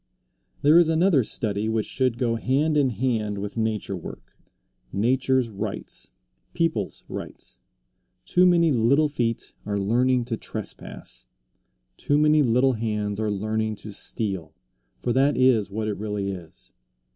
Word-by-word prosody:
There 155 +4 +7
is 170 -2 +4
another 165 -2 +4
study 105 -1 -2
which 110 -1 0
should 130 -3 0
go 120 -2 +1
hand 135 +7 +1
in 140 -3 +3
hand 110 -3 -1
with 100 +1 -5
nature 110 -3 -1
work 90 - -10 0.6
nature's 130 +3 +1
rights, 105 -3 -3 0.5
people's 160 - -1
rights. - - -7 0.7
Too 180 0 +4
many 170 -2 +4
little 135 +5 +3
feet 120 -5 -2
are 100 0 -2
learning 120 +5 +2
to 115 -1 -3
trespass; - - -5 0.7
too 145 - +1
many 150 0 +4
little 125 +1 +3
hands 105 -2 -2
are 110 -1 0
learning 110 +2 -1
to 105 - -6
steal, 95 -5 -2 0.4
for 120 - -1
that 135 +3 +3
is 125 -6 +3
what 110 +2 -3
it 105 - -2
really 105 -1 -3
is. 80 -10 -11
115 Hz, 140 wpm, -25 LUFS, 105-130 Hz, 0.7 s, There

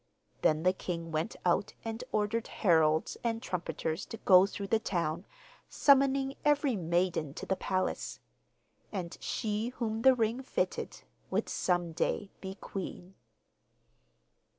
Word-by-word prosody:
Then 155 +1 +3
the 185 +1 +4
king 170 -3 -4
went 160 +8 -1
out 180 +3 +1
and 225 +2 -4
ordered 215 +2 0
heralds 160 -5 +2
and 230 -1 0
trumpeters 165 - -3
to 225 - -7
go 190 -2 +6
through 200 0 -6
the 225 - +3
town, 170 -4 -2 0.4
summoning 275 -1 +4
every 295 -3 +3
maiden 170 -4 0
to - - -6
the 190 - +1
palace. 185 0 -2 0.7
And 180 -4 -4
she 215 +1 -1
whom 225 -3 -3
the 265 +1 +7
ring 230 +2 0
fitted 265 - -2 0.3
would - - 0
some 175 -2 0
day 195 +4 -1
be 190 0 -6
queen. 190 -2 -7
195 Hz, 130 wpm, -31 LUFS, 170-225 Hz, 0.7 s, the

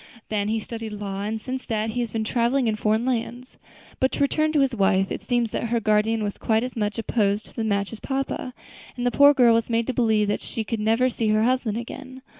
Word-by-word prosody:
Then 205 -1 -1
he 220 +1 0
studied 225 0 -6
law, 200 -1 -5
and 215 +2 -3
since 255 +3 -5
that 220 -1 -1
he 245 - -3
has 235 - -2
been 220 0 -2
traveling 240 +3 +1
in 220 - +1
foreign 215 +2 +1
lands. 250 0 -3 0.4
But 260 - +2
to - - -3
return 310 +2 +2
to 295 - +3
his 270 -2 +2
wife; 195 -3 +2
it - - -3
seems 240 -3 0
that - - -2
her 235 +1 0
guardian 215 +1 +1
was 205 -1 -4
quite 220 0 +1
as 255 - -5
much 210 -1 -2
opposed 210 -2 0
to - - -14
the 230 - -2
match 200 -1 -1
as 220 - -8
papa; 270 -1 -3 0.4
and 245 - -2
the 245 - +2
poor 285 +2 +6
girl 245 -3 +6
was 230 +1 +1
made 230 0 +1
to 260 - -2
believe 220 -3 +2
that 205 - -1
she 225 -3 -4
should 230 - -2
never 225 +4 +2
see 230 -1 -1
her 215 0 +3
husband 245 -3 +1
again. 260 +2 -8
225 Hz, 245 wpm, -24 LUFS, 215-250 Hz, 0.4 s, poor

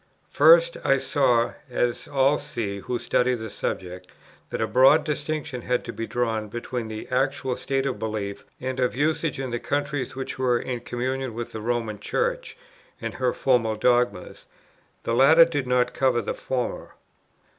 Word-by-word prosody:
First - - +6
I - - +4
saw, 125 -5 +2 0.2
as 120 -1 -1
all 140 +1 +2
see 100 -3 -4
who 120 +5 -3
study 125 +1 +1
the 110 -2 -7
subject, 90 0 -4 0.4
that - - -4
a 110 - +2
broad 135 +6 +5
distinction 150 -3 -3
had 125 0 -1
to 120 - -6
be 115 - -5
drawn 115 -3 -1
between 120 +1 -5
the 110 0 -7
actual 130 0 0
state 135 +1 -1
of 130 -6 -2
belief 105 -2 -4 0.2
and 130 0 -4
of 125 -1 +1
usage 150 +1 0
in 130 -2 -3
the 120 - -2
countries 145 -2 -2
which 135 0 -5
were 125 -2 +2
in 125 0 -4
communion 125 +1 -3
with 120 0 -5
the 110 - -6
Roman 115 -2 -2
Church, - - -2 0.4
and - - -4
her 125 -1 0
formal 120 -4 +1
dogmas; 120 -3 0 0.6
the 115 - -1
latter 155 +7 +7
did 145 -6 -3
not 125 0 +2
cover 130 -3 +1
the - - -2
former. 125 -2 -4
125 Hz, 165 wpm, -25 LUFS, 115-135 Hz, 0.6 s, latter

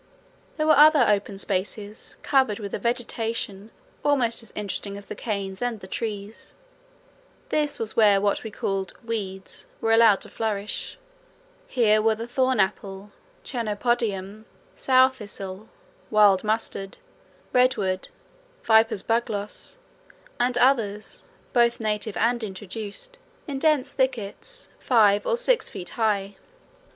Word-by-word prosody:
There 310 - +1
were 310 -1 +6
other 295 -2 +7
open 200 -1 +1
spaces 200 +2 -4
covered 265 -7 +2
with 200 -3 -7
a - - -2
vegetation 225 -4 -3 0.3
almost 250 -6 +2
as 230 - -12
interesting 200 -1 -4
as 200 - -10
the - - -6
canes 200 -3 -4
and 245 -3 -1
the 190 - -10
trees: 210 +1 -6 0.9
this 300 -1 0
was 220 -1 -4
where 205 -3 +5
what 200 0 0
were 220 - -5
called 195 -2 -3
"weeds" 195 -4 -5
were 225 - 0
allowed 225 -3 +6
to - - -4
flourish. 210 -2 -3 0.7
Here 215 -4 +3
were 220 0 +3
the 225 +2 -5
thorn 255 0 +1
apple, 195 0 -2 0.3
chenopodium, 215 -3 -2 0.3
sow 260 0 +5
thistle, 205 -4 -8 0.4
wild 205 -3 +5
mustard, 215 -2 -2 0.6
redweed, 200 -7 +2 0.5
viper's 220 -3 +4
bugloss, 225 - -2 0.6
and 245 0 +2
others, 225 -5 +2 0.3
both 235 -1 +3
native 215 -1 -2
and 235 +1 +1
introduced, 210 - -7 0.3
in 275 -2 -3
dense 295 -3 +2
thickets 260 - -3
five 210 -5 +4
or 475 - +2
six - - +2
feet 180 - -7
high. 200 -3 -1
220 Hz, 125 wpm, -25 LUFS, 200-245 Hz, 0.9 s, other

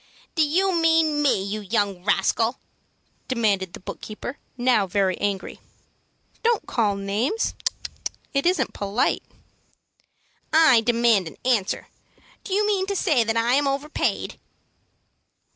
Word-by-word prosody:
"Do 320 - +1
you 365 +6 +2
mean 325 -3 +3
me, 270 -9 +2
you 205 +2 -4
young 200 -3 -1
rascal?" 225 +5 +1 0.7
demanded 205 -7 0
the - - -8
book - - -8
keeper, 220 +5 -7 0.2
now 245 -5 +2
very 190 0 +1
angry. 200 -2 -3 0.8
"Don't 465 -1 +1
call 210 -4 +1
names. 210 - -1 0.8
It 275 +4 +1
isn't 365 +1 +1
polite." 205 +4 0 1.3
"I 315 -7 +6
demand 230 -5 +3
an - - -10
answer. 230 -7 0 0.6
Do - - -9
you 420 +1 +2
mean 395 -2 +1
to 400 - -2
say 310 - +2
that 225 +1 -1
I 230 +2 +2
am 280 +1 +3
overpaid?" 280 +2 -2
240 Hz, 125 wpm, -24 LUFS, 205-310 Hz, 1.3 s, I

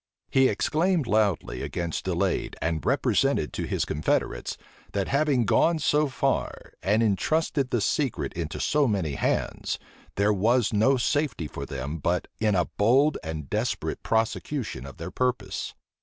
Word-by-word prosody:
He 130 0 +5
exclaimed 165 +1 +1
loudly 105 -6 +1
against 85 -2 -3
delay, - - 0
and 80 0 -1
represented 125 - +1
to - - -3
his - - 0
confederates, 75 - -1 0.4
that 100 -2 0
having 140 -4 +2
gone 165 +10 +3
so 150 0 +2
far, 135 0 -2
and 105 +4 +2
intrusted 135 - +1
the 120 - 0
secret 105 - 0
into 80 -3 -4
so 150 -2 +2
many 95 -9 0
hands, - - -1 0.4
there 100 +2 +3
was 115 +4 +2
no 110 +6 +4
safety 135 - 0
for - - -7
them 70 +4 -4
but 85 +4 0
in 105 -2 +2
a 90 -2 +2
bold 135 +9 +3
and 80 -3 -5
desperate - - -2
prosecution 115 - -1
of 70 - -11
their 85 +2 -6
purpose. 125 -6 -2
110 Hz, 145 wpm, -26 LUFS, 85-135 Hz, 0.4 s, He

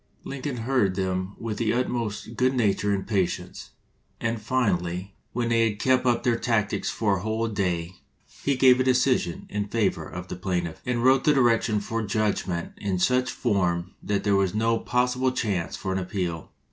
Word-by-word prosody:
Lincoln 140 -1 -4
heard 115 -5 +1
them 95 0 -2
with 110 -2 -4
the 115 -2 +1
utmost 115 -3 -2
good 130 +3 +2
nature 105 -3 +1
and 100 -1 -1
patience, 95 -5 -2 0.5
and 115 -1 -2
finally, 95 -6 -1 0.2
when 120 0 -1
they 115 -1 +3
had 105 - -5
kept 130 +2 +2
up 120 -1 +2
their 120 -2 +2
tactics 110 -4 0
for 105 -3 +1
a - - -5
whole 110 +2 -1
day, 90 -4 -2 0.5
he 140 - +2
gave 130 -1 +6
a - - +4
decision 130 -8 +1
in 105 0 -3
favor 105 -2 0
of 90 +1 -7
the - - -5
plaintiff, 90 -3 -3
and 120 -1 0
wrote 130 +1 +5
the 150 - +5
direction 115 -4 +3
for 115 +2 -3
judgment 100 -5 -1
in 100 -2 -2
such 125 +7 +2
form 90 -6 0
that 100 -1 -1
there 100 -1 +3
was 100 0 +1
no 115 +1 +2
possible 125 +1 +1
chance 100 -8 -2
for 95 - -3
an 95 - 0
appeal. 90 -3 -3
110 Hz, 180 wpm, -26 LUFS, 95-125 Hz, 0.5 s, gave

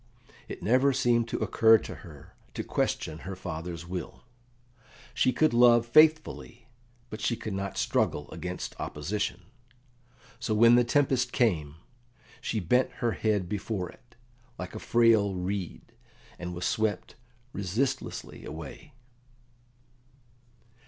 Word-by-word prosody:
It - - -8
never 130 +5 +3
seemed 120 -3 +2
to - - -3
occur 115 0 +5
to - - -8
her - - -14 0.2
to - - -3
question 80 0 -2
her 95 +3 -6
father's 85 -1 -6
will. 90 0 -6 0.9
She 130 - +2
could 155 +3 +2
love 120 -1 +6
faithfully, 155 -3 +3 0.5
but 110 - -6
she 115 - +1
could 110 -2 -6
not 100 0 -4
struggle 75 - 0
against - - -5
opposition. 95 +5 -3 1.0
So 115 -2 -1
when 115 +2 +6
the 120 0 +6
tempest 130 -1 +1
came, 80 - +1 0.7
she 110 - -2
bent 125 +8 +2
her 120 -1 -1
head 105 -5 0
before 100 -1 -3
it, 120 0 -23 0.4
like 90 - -7
a 110 - -6
frail 110 -5 +3
reed, 90 0 -5 0.5
and 90 0 -5
was 90 - -4
swept 110 -3 -1 0.4
resistlessly 100 +8 -3
away. 80 - -9
110 Hz, 125 wpm, -28 LUFS, 90-120 Hz, 1.0 s, love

